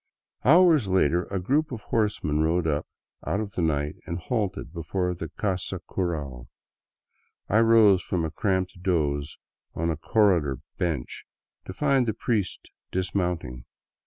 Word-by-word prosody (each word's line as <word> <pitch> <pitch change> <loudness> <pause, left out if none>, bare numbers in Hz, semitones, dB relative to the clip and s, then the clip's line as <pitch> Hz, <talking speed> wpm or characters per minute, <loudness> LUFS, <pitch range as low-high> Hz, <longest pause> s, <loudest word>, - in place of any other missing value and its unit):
Hours 160 - +6
later 90 -2 +2
a 100 - -3
group 140 - +1
of 115 -4 -5
horsemen 100 -9 0
rode 80 +2 +1
up 75 -2 -1 0.4
out 100 - -1
of 105 -2 -4
the - - -2
night 75 -2 0
and 85 - -3
halted 100 -4 -3
before 90 +2 -2
the 80 -2 -6
casa 95 -4 -2
cural. 70 -9 -3 1.0
I 110 - +3
rose 110 -5 +6
from 85 -3 -1
a 80 - -4
cramped 95 +1 -1
doze 75 -5 0 0.4
on 85 +1 0
a 80 - -3
cor 100 +6 +3
redor 70 -3 -4 0.2
bench 80 -8 -3 0.4
to 95 - -7
find 135 0 +2
the 110 - -1
priest 110 -5 -1 0.3
dismounting. 90 -9 -2
90 Hz, 145 wpm, -26 LUFS, 80-105 Hz, 1.0 s, Hours